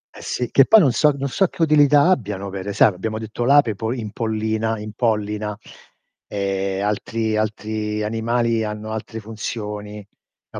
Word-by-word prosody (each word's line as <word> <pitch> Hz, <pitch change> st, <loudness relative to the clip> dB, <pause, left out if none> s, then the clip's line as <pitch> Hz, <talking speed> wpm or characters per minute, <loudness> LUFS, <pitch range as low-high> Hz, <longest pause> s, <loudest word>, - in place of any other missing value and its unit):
Eh -, -, -11 dB
sì, 125 Hz, -2 st, -3 dB
che 135 Hz, -, +6 dB
poi 220 Hz, -, +8 dB
non 140 Hz, -10 st, +4 dB
so 150 Hz, +5 st, +3 dB
non 140 Hz, 0 st, -2 dB
so 190 Hz, +8 st, +1 dB
che 170 Hz, -, -2 dB
utilità 145 Hz, 0 st, +5 dB
abbiano 100 Hz, -, -1 dB
pere 95 Hz, +1 st, -5 dB
sai 105 Hz, -, +5 dB
abbiamo 110 Hz, +4 st, -4 dB
detto 110 Hz, +2 st, -4 dB
l'ape 140 Hz, -4 st, +5 dB
po 110 Hz, +3 st, -3 dB
impollina 110 Hz, -1 st, -2 dB
impollina, 105 Hz, -1 st, -2 dB, 0.7 s
e 100 Hz, -1 st, -2 dB
altri 110 Hz, +1 st, -1 dB
altri 105 Hz, 0 st, -2 dB
animali 115 Hz, +1 st, 0 dB
hanno 105 Hz, 0 st, -5 dB
altre 110 Hz, +1 st, -5 dB
funzioni. 105 Hz, -1 st, -6 dB, 0.4 s
No, -, -, -7 dB
110 Hz, 155 wpm, -21 LUFS, 105-115 Hz, 0.7 s, poi